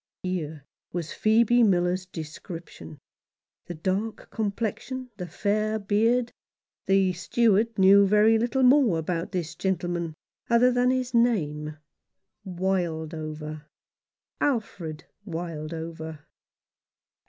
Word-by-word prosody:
Here 160 -6 -4 0.3
was 170 -3 -4
Phoebe 230 +2 +4
Miller's 185 -3 +2
description: 160 -1 -9 0.7
the 175 - -5
dark 190 +7 -3
complexion 220 +4 -2
and 255 -1 -9
the 180 - -5
fair 215 +5 0
beard. 225 +4 +1 0.6
The 195 -1 +3
steward 220 +4 +2
knew 195 +1 +7
very 210 +2 +5
little 245 +3 +1
more 250 - +5
about 165 +2 -2
this 175 -3 -3
gentleman 175 -3 -2 0.3
than 245 +1 +4
his 255 -1 -1
name 155 -11 +1 0.3
— - - -57
Wildover, 160 -4 -3 0.7
Alfred 185 - -2 0.2
Wildover. 160 -3 -6
185 Hz, 95 wpm, -26 LUFS, 165-225 Hz, 0.7 s, knew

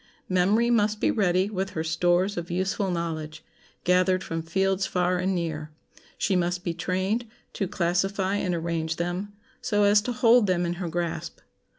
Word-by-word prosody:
Memory 200 +6 +3
must 215 -2 +2
be - - +2
ready 185 -3 +2
with 195 -2 -3
her 160 - 0
stores 175 +4 +1
of 175 0 -5
useful 190 +2 -1
knowledge, 160 -3 -4 0.4
gathered 185 +1 +3
from 165 0 -3
fields 190 +3 0
far 180 -1 +1
and 190 +1 0
near. 160 -3 -3 0.5
She 195 - +1
must 180 0 0
be 170 - -2
trained 190 +7 -1 0.3
to 195 - -2
classify 190 +3 0
and 180 -3 -1
arrange 165 -1 -2
them, 175 +4 -3 0.3
so 205 -3 +1
as 205 +1 +5
to 245 - -3
hold 240 -2 +4
them 180 -1 +1
in 170 - -1
her 175 - -2
grasp. 170 0 -3
185 Hz, 170 wpm, -26 LUFS, 170-195 Hz, 0.5 s, as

